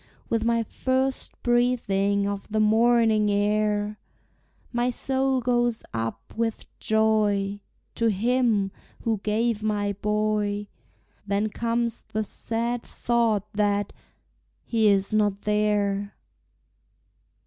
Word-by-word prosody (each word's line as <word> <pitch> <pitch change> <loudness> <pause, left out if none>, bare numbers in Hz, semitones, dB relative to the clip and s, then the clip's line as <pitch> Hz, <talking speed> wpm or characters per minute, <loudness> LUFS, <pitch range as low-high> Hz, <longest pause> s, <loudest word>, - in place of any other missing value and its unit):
With 230 -1 +1
my 230 0 +2
first 260 +3 -1
breathing 205 -5 +2
of 200 -1 -4
the 215 0 0
morning 220 0 +4
air 210 0 0 0.7
My 240 +1 +1
soul 265 +1 +1
goes 240 -1 +1
up, 115 0 -4
with 225 -1 -2
joy, 210 -2 +1 0.3
To 230 - +1
Him 220 -1 +1 0.3
who 225 -3 0
gave 215 +2 0
my 205 -1 0
boy; 210 0 -1 0.6
Then 200 +2 0
comes 235 +1 -1
the 215 +1 -3
sad 235 +3 -2
thought 225 -4 0
that 205 -1 0 0.7
he 225 -2 +2
is 195 0 +3
not 205 -2 +1
there! 205 -1 0
215 Hz, 105 wpm, -25 LUFS, 205-235 Hz, 0.7 s, morning